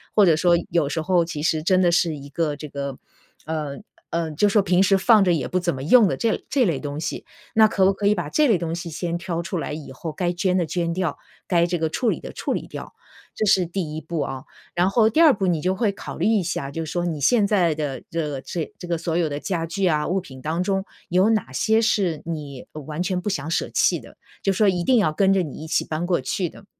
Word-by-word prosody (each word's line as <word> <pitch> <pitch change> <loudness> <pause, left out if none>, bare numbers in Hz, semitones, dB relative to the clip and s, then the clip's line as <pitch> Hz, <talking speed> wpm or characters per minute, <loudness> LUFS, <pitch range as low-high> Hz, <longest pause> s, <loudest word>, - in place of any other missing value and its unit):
或 210 - +6
者 165 -4 +4
说 175 +1 +4
有 165 -4 +1
时 160 +3 -2
候 175 0 +2
其 165 -3 -5
实 160 -1 +1
真 185 +3 +3
的 175 -2 +4
是 170 -2 +2
一 140 -1 -10
个 150 0 -1
这 150 +1 -8
个， 140 -1 -5 0.5
呃， 150 -3 -3 0.3
呃， 165 -1 -1
就 165 +8 +2
说 205 +1 +4
平 185 -1 +2
时 195 0 +4
放 215 +1 +5
着 180 -2 +3
也 145 -7 -1
不 185 - 0
怎 175 -1 -1
么 130 - -6
用 220 - +6
的 - - 0
这 230 -2 0
这 270 -4 +3
类 165 -8 0
东 145 0 -5
西。 155 - -4 0.3
那 220 0 +7
可 195 -2 +1
不 195 - +5
可 200 +1 -4
以 205 - +5
把 175 -6 -3
这 300 - +3
类 220 -7 +4
东 165 -1 -3
西 170 0 -6
先 170 +1 -3
挑 175 -2 -3
出 180 +2 -4
来 150 - -3
以 150 -3 -7
后 155 +5 -6
该 175 +2 -1
捐 180 +1 0
的 175 - +1
捐 170 0 -1
掉， 175 -4 -2 0.3
该 170 -2 +3
这 175 0 -1
个 160 0 0
处 235 +8 0
理 - - -3
的 - - -8
处 - - -3
理 - - -4
掉， - - -8 0.4
这 - - -2
是 185 -2 +4
第 170 -3 -4
一 155 - -4
步 160 +1 -4
啊。 130 -1 -4 0.3
然 175 +2 +3
后 220 0 +4
第 310 - 0
二 320 -4 +7
步 195 -5 -1
你 170 -4 +1
就 185 +3 +1
会 210 +1 +1
考 - - -8
虑 - - +1
一 220 -4 +3
下， 140 -4 -3
就 160 +3 -4
是 155 - -7
说 175 0 -1
你 160 -3 -3
现 205 - +3
在 180 -6 +2
的 145 -4 -4
这 150 -4 -2
这 170 - -5
个 - - -4
这 180 - -9
个 170 -1 0
所 165 0 -1
有 170 -2 +2
的 145 0 -4
家 170 0 -2
具 185 +4 -1
啊， 150 -3 +1
物 185 +3 0
品 130 -7 -12
当 160 +3 -1
中 195 +1 -1 0.2
有 185 +4 +3
哪 215 -11 0
些 220 - +2
是 190 -8 +1
你 150 -5 -6 0.2
完 155 +3 -4
全 185 0 -1
不 185 - -3
想 160 -4 -3
舍 165 - 0
弃 - - +2
的， - - -15 0.3
就 195 - +2
说 205 +2 +3
一 180 -2 0
定 255 +6 +4
要 190 -7 +2
跟 195 +5 +3
着 195 - +3
你 155 -6 -5
一 - - -7
起 160 - +1
搬 155 +2 -3
过 175 -5 +1
去 175 +6 -2
的。 200 - -15
175 Hz, 290 characters per minute, -23 LUFS, 155-190 Hz, 0.5 s, 那